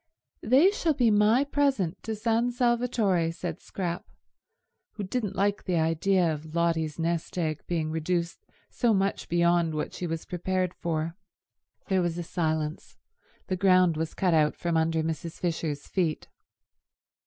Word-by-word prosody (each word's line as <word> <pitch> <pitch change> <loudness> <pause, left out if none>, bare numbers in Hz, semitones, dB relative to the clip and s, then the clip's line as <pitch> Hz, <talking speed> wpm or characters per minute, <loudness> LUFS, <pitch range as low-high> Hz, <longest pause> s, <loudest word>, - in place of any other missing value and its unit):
"They 275 - +5
shall 335 -7 0
be 240 -5 +3
my 210 +5 +4
present 275 - 0
to 220 -1 -4
San 230 +2 +1
Salvatore," 235 -8 +1
said 165 -1 -5
Scrap, 175 -2 -4 0.8
who 210 - -5
didn't 200 0 -2
like 200 +1 0
the 180 - 0
idea 165 +2 +2
of 155 +2 -8
Lotty's 165 -3 0
nest 170 +1 -2
egg 155 -3 -1
being 160 -3 -1
reduced 170 +2 -2 0.2
so 235 -4 +2
much 195 +1 -1
beyond 170 -1 +2
what 150 - -3
she 180 - -4
was 165 -1 -4
prepared 185 0 -1
for. 165 0 -3 0.7
There 190 -1 +2
was 175 -1 -1
a 175 - -3
silence. 160 -2 -2 0.5
The 185 - -1
ground 185 -2 +4
was 160 +1 -3
cut 160 -5 +2
from 170 -1 -2
under 160 0 +1
Mrs. 160 +1 -4
Fisher's 160 -4 -2
feet. 170 -5 -1
175 Hz, 145 wpm, -27 LUFS, 160-200 Hz, 0.8 s, They